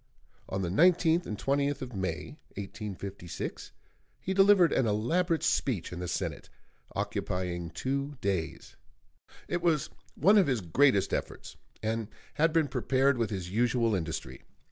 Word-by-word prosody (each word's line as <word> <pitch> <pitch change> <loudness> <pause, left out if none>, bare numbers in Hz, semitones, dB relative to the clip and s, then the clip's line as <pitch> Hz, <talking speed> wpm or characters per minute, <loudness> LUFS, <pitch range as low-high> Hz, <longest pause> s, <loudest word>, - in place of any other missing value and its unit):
On 95 0 -2
the 85 - -1
19th 170 - +4
and 105 - -4
20th 140 +2 0
of 125 -1 -8
May, 95 - -4 0.2
1856, 100 -3 -6 0.5
he 190 - -2
delivered 195 -3 +6
an 125 - +2
elaborate 160 - +1
speech 110 - 0
in 90 - -6
the 90 - -4
Senate, - - -3 0.5
occupying 90 -2 -2
two 140 - -3
days. 95 -6 -3 0.7
It 175 - -1
was 165 -4 +1 0.2
one 205 +2 +5
of 190 - +3
his 125 -5 +1
greatest 100 - +3
efforts, - - -4 0.3
and 110 0 -1 0.3
had 160 +2 +3
been 160 -2 +2
prepared 135 -1 +1
with 115 -3 +1
his 90 -4 -4
usual 115 +1 +2
industry. 80 -4 -4
120 Hz, 140 wpm, -30 LUFS, 95-155 Hz, 0.7 s, delivered